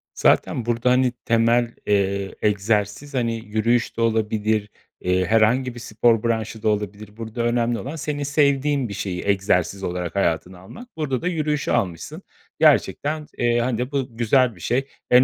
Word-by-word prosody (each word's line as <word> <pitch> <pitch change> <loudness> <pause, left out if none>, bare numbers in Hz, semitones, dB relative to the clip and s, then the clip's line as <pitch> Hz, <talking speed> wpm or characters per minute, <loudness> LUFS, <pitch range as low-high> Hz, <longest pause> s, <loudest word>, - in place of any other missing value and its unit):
Zaten 120 - +2
burada, 120 +1 +1
hani, 125 0 +3
temel, 115 +1 +2
eee, 100 -1 0
egzersiz, 105 +6 0
hani, 115 -3 0
yürüyüş 110 +3 0
de - - -1
olabilir, 110 -2 0 0.3
eee, 90 0 +1
herhangi 115 +5 +2
bir - - -8
spor 115 0 +1
branşı 110 -1 -2
da 110 - +3
olabilir. 105 0 -4
Burada 115 +1 -4
önemli 120 0 +1
olan 140 +6 -6
senin 150 -2 -3
sevdiğin 140 -2 +1
bir - - -5
şeyi 90 -2 -4
egzersiz 95 -1 +1
olarak 90 -1 -3
hayatına 90 -1 -1
almak. 220 - -12
Burada 140 -5 -1
da 180 - -2
yürüyüşü 155 -4 -1
almışsın, 90 -4 -2 0.4
gerçekten, 150 +1 +2
eee, 120 0 +2
hani, 125 +1 -1
bu 130 -5 -3
güzel 120 0 +3
bir 85 - -15
şey. 130 +9 0 0.2
En 125 +1 +8
115 Hz, 160 wpm, -22 LUFS, 105-125 Hz, 0.4 s, En